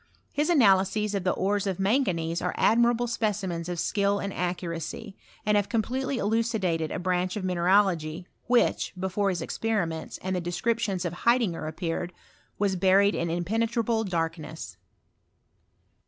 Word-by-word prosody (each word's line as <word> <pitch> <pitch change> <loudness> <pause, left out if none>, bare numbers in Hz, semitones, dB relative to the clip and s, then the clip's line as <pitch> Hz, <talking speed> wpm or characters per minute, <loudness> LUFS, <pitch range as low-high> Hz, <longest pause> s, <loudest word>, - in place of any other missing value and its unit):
His 295 +3 0
analyses 210 - +3
of 200 -2 -1
the 185 - +2
ores 200 +1 0
of 190 -3 -1
manganese 185 -7 +1
are 180 - -2
admirable 235 +1 +3
specimens 195 -7 -2
of 175 -1 -3
skill 200 +1 +1
and 200 -1 -4
accuracy, 180 +3 -4 0.3
and 210 0 +3
have 205 -1 +1
completely 255 +4 -1
elucidated 205 -8 0
a - - -3
branch 180 0 -1
of 210 - -4
mineralogy 180 -2 +2 0.2
which, 245 0 +2
before 190 +2 0
his 175 -3 -2
experiments, 170 -7 -2
and 185 0 -1
the 180 - -1
descriptioDS 190 +2 -1
of 170 - -2
Haidinger 220 -6 +1
appeared, 165 +2 -3 0.4
was 200 -2 +1
buried 195 +2 +4
in 170 - -1
impenetrable 225 +6 0
darkness. 165 -4 -4
190 Hz, 140 wpm, -27 LUFS, 175-220 Hz, 0.4 s, buried